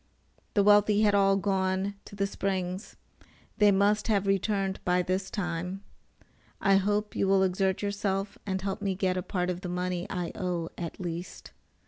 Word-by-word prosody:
The 200 - +5
wealthy 205 0 +5
had 205 -1 +4
all 195 -1 +4
gone 190 0 0
to - - -11
the 200 0 0
springs. 190 0 -3 0.6
They 210 -1 +6
must 205 +2 +2
have 205 -3 +2
returned 195 0 0
by 180 0 +2
this 185 +2 -1
time. 180 0 -3 0.8
I 195 -1 +4
hope 205 +2 0
you 195 - +1
will 195 0 +4
exert 190 +1 0
yourself 200 -1 -1
and 190 -2 -2
help 195 -1 -3
me 195 -2 -1
get 185 -1 0
a 185 - -1
part 180 0 -1
of 180 0 -5
the 180 - -5
money 180 0 -2
I 175 -2 -3
owe, 175 -4 -2
at 170 +2 -6
least. 175 -1 -6
195 Hz, 170 wpm, -28 LUFS, 180-200 Hz, 0.8 s, They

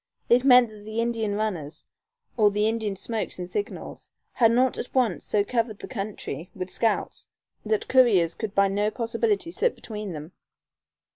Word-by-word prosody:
It 245 +1 +5
meant 250 -3 +7
that 210 -1 -13
the 220 +2 -4
Indian 230 -3 -1
runners, 170 -8 -3 0.5
or 215 -3 +5
the 210 +1 +1
Indian 220 -3 -1
smokes 225 +3 -4
and 180 -1 -5
signals, 205 +4 -5 0.2
had 230 -2 +4
not 255 +2 +2
at 250 - -7
once 250 -4 +1
so 205 - +1
covered 225 -1 -1
the - - -8
country 195 - -5
with 185 -1 -5
scouts 225 -3 -1 0.4
that 435 0 -1
couriers 205 -11 +4
could 215 -3 -5
by 200 0 +5
no 205 +2 0
possibility 230 +3 -1
slip 485 +6 0
between 210 -3 -7
them. 155 +2 -8
215 Hz, 165 wpm, -25 LUFS, 200-235 Hz, 0.5 s, meant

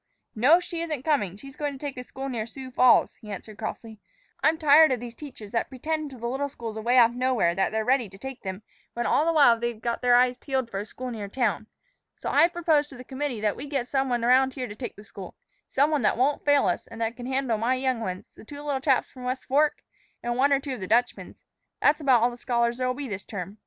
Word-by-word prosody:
"No, 275 +10 +5
she 345 -2 -5
isn't 305 -6 -3
coming; 205 - 0
she's 275 +5 -11
going 290 -1 -3
to - - -8
take 285 0 -5
a 250 - -6
school 265 +2 -7
near 230 -4 -3
Sioux 260 +2 -9
Falls," 255 0 +4
he 210 -2 -9
answered 205 +2 -8
crossly. 220 0 -6 0.4
"I'm 320 +1 +4
tired 310 0 +6
of 255 - 0
these 240 0 -8
teachers 240 -7 -10
that 230 - -1
pretend 305 +3 -3
to 265 - -11
the 235 - -7
little 270 +4 -2
schools 230 -4 -7
away 235 +3 +1
off 235 -2 +7
nowhere 250 -8 +1
that 190 +2 0
they're 220 0 -1
ready 250 -4 +2
to 195 - -14
take 265 +3 -8
them, 190 +1 -6 0.3
when 240 0 -2
all 305 +6 +2
the - - +4
while 280 -8 +5
they've 235 -1 -3
got 235 +1 -2
their 245 -1 +4
eyes 250 0 +4
peeled 260 -3 -2
for 195 - -3
a 205 - -6
school 255 +2 -7
near 215 -3 -5
town. 220 -1 -1 0.5
So - - -4
I've 335 - +5
proposed 320 -4 +1
to 270 - -12
the 250 - -9
committee 265 -3 -4
that 210 -1 +1
we 285 - -7
get 275 -4 -2
some 270 0 0
one 240 -1 0
about 260 +2 +4
here 255 -3 -4
to 205 - -8
take 245 +2 -6
the 205 - -13
school 195 -2 -10 0.3
some 285 +3 +2
one 300 -3 +1
that 210 - +2
won't 275 +4 +1
fail 285 -4 +4
us, 180 - -1
and 230 - -11
that 230 +1 -1
can 245 0 -7
handle 260 -4 0
my 240 +4 +1
young 260 -2 -1
ones, 185 -4 -5
the - - -14
two 285 +5 -10
little 280 -3 -2
chaps 270 -2 +1
from 255 - -12
the 250 - -5
West 255 +1 -3
Fork, 295 +3 +1 0.4
and 240 0 -1
one 275 +3 +3
or 275 - +4
two 275 -1 -5
of 255 - -6
the 185 - -5
Dutchman's. 240 +4 -1 0.3
That's 295 +1 +3
about 255 -5 +4
all 245 - +3
the 240 - -10
scholars 235 0 0
there'll 255 0 0
be 285 0 -5
this 200 -3 -5
term. 200 +1 -7
250 Hz, 265 wpm, -26 LUFS, 225-275 Hz, 0.5 s, off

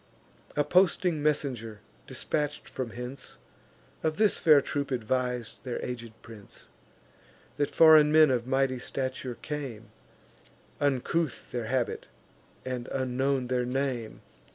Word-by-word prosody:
A 145 - +3
posting 175 0 +3
messenger, 130 -8 -1 0.3
dispatch'd 150 -1 -2
from 130 -3 -4
hence, 125 +4 -8 0.6
Of 155 0 -1
this 215 -3 +3
fair 155 -3 +7
troop 140 +1 -3
advis'd 125 -1 -2
their 125 -2 -3
aged 115 -3 -7
prince, 110 -4 -11 0.9
That 145 -1 +1
foreign 155 -2 +7
men 155 -2 +6
of 120 -1 0
mighty 135 -1 +1
stature 130 -1 -4
came; 135 -7 -6 0.9
Uncouth 145 +2 -1
their 120 -2 -3
habit, 125 +1 -1 0.6
and 125 -2 -4
unknown 130 0 0
their 125 0 0
name. 125 -3 -2
130 Hz, 115 wpm, -28 LUFS, 125-150 Hz, 0.9 s, fair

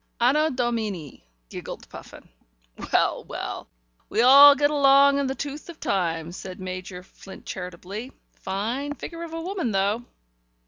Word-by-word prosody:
"Anno 290 +6 +3
Domini," 215 - -3 0.2
giggled - - -8
Puffin. - - -12 0.6
"Well, - - +2
well, - - -6 0.4
we 225 - +2
all 280 +3 +9
get 290 +1 +2
long 280 -1 +5
in 280 - 0
the 265 - -3
tooth 290 +4 -6
in 340 - -8
time," 170 - -2
said 185 +1 -9
Major 185 0 -7
Flint 190 +1 -14
charitably. 190 +6 -7 0.2
"Fine 235 +10 -3
figure 335 +5 -8
of 335 -1 -7
a - - -4
woman, 360 - -3
though." 200 +4 0
240 Hz, 140 wpm, -24 LUFS, 190-285 Hz, 0.6 s, all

